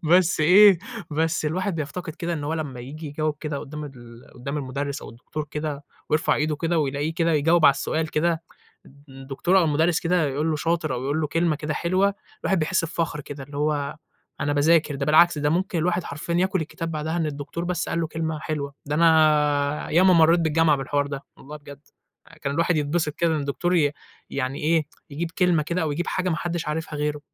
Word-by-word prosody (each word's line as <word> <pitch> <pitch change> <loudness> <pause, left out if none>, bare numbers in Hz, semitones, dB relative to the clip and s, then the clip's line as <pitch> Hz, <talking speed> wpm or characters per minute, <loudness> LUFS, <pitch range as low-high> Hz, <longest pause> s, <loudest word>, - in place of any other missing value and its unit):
بس 175 +1 +3
إيه، 190 +3 +7 0.3
بس 160 +1 0
الواحد 185 +4 -1
بيفتقد 160 +1 -5
كده 175 -2 -3
إن 150 -3 -3
هو 160 +2 -1
لمّا 140 -6 -5
ييجي 150 +5 -8
يجاوب 150 +1 -2
كده 150 -3 -3
قُدام 150 +1 -7
ال 120 -4 -12
قُدام 140 +4 -5
المُدرّس 140 +1 -4
أو - - -9
الدكتور 150 +6 -7
كده، 150 -1 -4 0.3
ويرفع 155 +1 +2
إيده 150 0 0
كده، 165 +1 0
ويلاقيه 145 +2 -1
كده 165 -1 +1
يجاوب 160 +2 +3
على 140 - +7
السؤال 155 +3 -2
كده، 165 +1 0 0.4
الد 140 +1 -19
الدكتور 135 +8 0
أو 180 - +4
المُدرّس 160 +2 +2
كده 170 -2 +1
يقول 150 +4 -1
له 155 - 0
شاطر 165 -4 -1
أو 125 - -4
يقول 145 +3 0
له 150 - 0
كلمة 165 0 +1
كده 150 0 -3
حلوة، 190 +3 +1 0.3
الواحد 190 - +1
بيحس 165 +2 +1
بفخر 165 -2 -2
كده، 140 -1 -8
اللي 145 +1 -10
هو 145 0 -1 0.4
أنا 145 - 0
باذاكر، 150 +1 +3
ده 140 0 -3
بالعكس 155 +1 +5
ده 145 0 +1
ممكن 175 +1 0
الواحد 175 +2 0
حرفيًا 170 +3 -4
ياكل 190 +1 +1
الكتاب 165 +1 -5
بعدها 155 +2 -3
إن 165 -2 0
الدكتور 145 +3 -5
بس 180 0 -2
قال 165 - -1
له 165 - 0
كلمة 160 -1 -3
حلوة، 145 -3 -4
ده 145 - -2
أنا 150 -3 +3
ياما 185 +3 +5
مرّيت 165 0 +5
بالجامعة 160 -2 +3
بالحوار 140 +1 -1
ده، 140 -1 -6
والله 150 +2 -10
بجد 145 -1 -12 0.6
كان 140 -1 -1
الواحد 170 +1 +2
يتبسط 150 +1 0
كده 170 -2 +1
إن 150 - -1
الدكتور 170 +6 -1
ي 145 -3 +3 0.4
يعني 135 0 -2
إيه 155 0 +2 0.2
يجيب 165 +4 -3
كلمة 175 -3 +2
كده 170 +4 -2
أو 155 -2 -1
يجيب 175 +4 -3
حاجة 185 0 -1
ما 165 - 0
حدش 170 -2 -3
عارفها 155 0 -3
غيره، 150 0 -2
155 Hz, 205 wpm, -24 LUFS, 145-170 Hz, 0.6 s, إيه